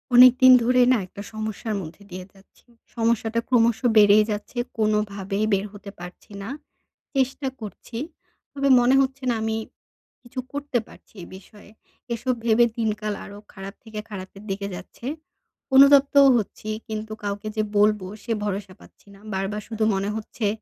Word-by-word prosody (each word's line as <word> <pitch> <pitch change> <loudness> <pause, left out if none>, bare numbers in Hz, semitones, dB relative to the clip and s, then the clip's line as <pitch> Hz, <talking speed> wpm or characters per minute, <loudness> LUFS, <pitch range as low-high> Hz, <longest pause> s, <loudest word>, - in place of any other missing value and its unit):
অনেকদিন 255 +1 +8
ধরে 250 +2 +3
না 255 - +4
একটা 200 - -10
সমস্যার 215 0 -4
মধ্যে 175 +4 -10
দিয়ে 185 0 -6
যাচ্ছি। 195 +5 -24 0.3
সমস্যাটা 230 0 0
ক্রমশ 235 -2 +3 0.2
বেড়েই 210 0 +7
যাচ্ছে 210 +4 -6 0.2
কোনোভাবেই 210 -2 0
বের 195 +1 +1
হতে 205 0 -10
পারছি 180 +4 -11
না। 200 - -6 0.7
চেষ্টা 265 +1 0
করছি 220 +2 -8 0.6
তবে 275 0 0
মনে 245 +2 +4
হচ্ছে 270 0 -2
না 240 - +1
আমি 220 0 -1 0.6
কিছু 255 +1 -8
করতে 285 -3 -2
পারছি - - -18
এই - - -10
বিষয়ে। 205 +2 -15 0.4
এসব 255 +2 -1
ভেবে 235 +1 +5
দিনকাল 215 -2 -1
আরও 200 - -10 0.2
খারাপ 195 0 -8
থেকে 220 -2 -7
খারাপের 195 0 -9
দিকে 200 +1 -3
যাচ্ছে, 235 - -10 0.7
অনুতপ্তও 280 0 +7
হচ্ছি, 215 0 -5 0.2
কিন্তু 220 0 -5
কাউকে 205 +1 -4
যে 215 - +2
বলবো 210 -2 +3 0.2
সে 230 - -1
ভরসা 195 -1 -4
পাচ্ছি - - -20
না। - - -18
বারবার 195 +2 -2
শুধু 220 -1 -2
মনে 195 +1 -1
হচ্ছে 220 0 -3
215 Hz, 150 wpm, -24 LUFS, 200-240 Hz, 0.7 s, অনেকদিন